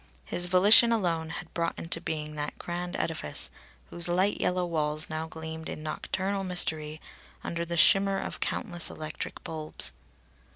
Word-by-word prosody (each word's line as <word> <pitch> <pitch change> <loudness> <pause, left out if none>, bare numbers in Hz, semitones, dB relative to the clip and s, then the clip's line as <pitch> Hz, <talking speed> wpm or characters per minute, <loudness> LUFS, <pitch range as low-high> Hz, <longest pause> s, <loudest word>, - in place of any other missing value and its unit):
His 175 0 +2
volition 205 +6 +7
alone 170 -7 0
had 165 +1 -7
brought 170 -1 -1
into 165 0 -3
being 155 -3 -4
that 150 0 -4
grand 175 0 -4
edifice 155 - -2 0.4
whose 170 0 +1
light 185 +4 +2
yellow 180 0 +1
walls 155 -2 -1
now 160 +1 -3
gleamed 160 0 -7
in 155 - -6
nocturnal 190 +5 -2
mystery 155 -4 0 0.4
under 170 0 -2
the 170 0 -3
shimmer 195 +3 +6
of - - -4
countless 175 -5 0
electric 155 0 -6
bulbs. 155 -1 -3
170 Hz, 150 wpm, -29 LUFS, 155-180 Hz, 0.4 s, volition